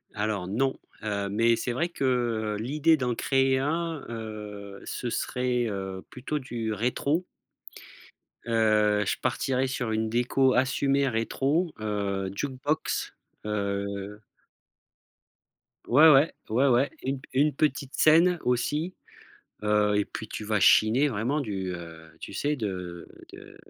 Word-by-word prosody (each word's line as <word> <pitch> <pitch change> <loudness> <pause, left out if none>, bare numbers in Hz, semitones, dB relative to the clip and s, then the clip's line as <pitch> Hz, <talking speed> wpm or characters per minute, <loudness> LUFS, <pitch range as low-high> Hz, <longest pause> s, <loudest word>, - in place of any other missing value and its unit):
Alors, 105 -3 -2
non, 130 +7 0 0.2
heu, 100 -2 -2
mais 115 +3 +3
c'est 120 +2 -3
vrai 170 +8 -1
que 120 -7 0
l'idée 150 +7 +2
d'en 125 -3 -1
créer 135 +2 +2
un, 160 +1 -2
heu, 105 -3 -7
ce 120 - -4
serait, 125 -2 -1
heu, 95 -2 -5
plutôt 140 +4 -4
du 115 -5 -4
rétro. 140 - 0 1.2
Heu, 110 -2 +3
je - - 0
partirais 130 0 0
sur 125 -3 -2
une 110 0 0
déco 125 +3 +2
assumée 140 +1 +2
rétro, 140 +9 0
heu, 100 -2 -2
jukebox, 140 +6 -2 0.3
heu 100 0 -3 1.7
Ouais, 150 +6 +7
ouais. 140 +3 +5 0.2
Ouais, 125 +6 +3
ouais, 130 +2 +3
une 135 0 -2
p - - -16
une 145 +3 +3
petite 140 -2 -1
scène, 170 +3 +5
aussi, 150 +8 0 0.7
heu 105 0 +2
et 105 - +2
puis 110 - -8
tu 105 - -6
vas 105 -1 0
chiner 120 +10 +5
vraiment 130 +5 -1
du, 95 -7 -3
heu, 80 -2 -10
tu - - -8
sais, 145 +1 0
de 90 -6 -5 0.2
de - - -13
120 Hz, 130 wpm, -27 LUFS, 105-135 Hz, 1.7 s, Ouais